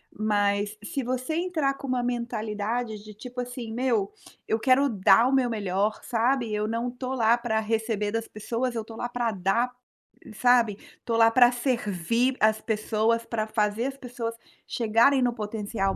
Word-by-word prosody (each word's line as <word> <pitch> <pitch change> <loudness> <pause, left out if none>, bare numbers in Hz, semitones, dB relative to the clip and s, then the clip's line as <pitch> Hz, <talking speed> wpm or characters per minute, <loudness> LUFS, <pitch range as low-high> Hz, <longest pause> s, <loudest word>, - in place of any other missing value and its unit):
Mas, 205 0 0
se 275 +6 -3
você 255 +5 -2
entrar 325 -5 0
com 275 - -8
uma 255 -1 0
mentalidade 225 -2 -3
de, 215 - -11
tipo 250 +3 -8
assim: 245 -2 -6
"Meu, 230 -5 0 0.4
eu 220 - +1
quero 270 +4 +4
dar 200 +2 +5
o - - 0
meu 260 -2 +3
melhor, 205 -1 -1
sabe, 240 -1 0
eu 210 0 -1
não 230 +2 -2
estou 255 +1 -5
lá 230 -1 +4
para 235 -2 -1
receber 220 -1 -1
das 225 +1 -2
pessoas, 235 +4 -3
eu 225 - -1
estou 225 +1 -11
lá 240 - -3
para 240 -1 -1
dar, 210 +6 0 0.6
sabe. 240 -3 +3 0.2
Estou 230 -1 -2
lá 225 0 +6
para 245 0 +6
servir 240 - 0
as 215 0 +3
pessoas, 220 +1 0
pra 220 -2 -2
fazer 215 +1 0
as 270 0 -6
pessoas 240 -3 -5 0.3
chegarem 235 +4 +3
no 245 -1 +2
potencial 210 -2 -2
230 Hz, 170 wpm, -26 LUFS, 215-245 Hz, 0.6 s, lá